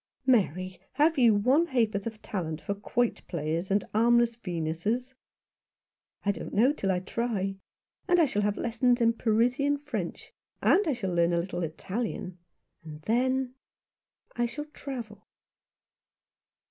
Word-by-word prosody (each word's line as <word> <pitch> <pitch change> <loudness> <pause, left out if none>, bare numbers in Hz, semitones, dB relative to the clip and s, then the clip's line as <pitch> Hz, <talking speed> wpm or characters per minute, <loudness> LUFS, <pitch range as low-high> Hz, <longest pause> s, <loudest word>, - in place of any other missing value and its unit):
"Mary, 185 - +1
have 305 0 +3
you 230 -4 +6
one 260 +11 +3
ha'porth 225 -6 0
of 220 -1 -6
talent 160 -6 -3
for 200 - -3
quoit 230 +4 -1
players 165 +2 -2
and 200 +1 +2
armless 235 +1 +4
Venuses? 200 +6 -2 0.5
" - - -54
"I 200 - +4
don't - - -7
know 245 +7 +5
till 195 -9 -2
I 180 -1 0
try. 195 -2 -2 0.5
And 355 -1 +4
I 330 - +6
shall 210 -7 0
have 205 0 0
lessons 245 +1 +2
in 230 -1 +4
Parisian 245 +6 +2
French; 295 +1 -5 0.3
and 400 -2 +4
I 300 - +2
shall 195 -7 -3
learn 170 0 +3
a 170 - +2
little 175 +1 -3
Italian; 185 +2 -4 0.4
and 155 -1 -10
then 255 +4 +1 0.4
— - - -37
I 240 0 +1
shall 295 +5 -6
travel." 240 -8 -8
225 Hz, 145 wpm, -28 LUFS, 185-250 Hz, 0.5 s, you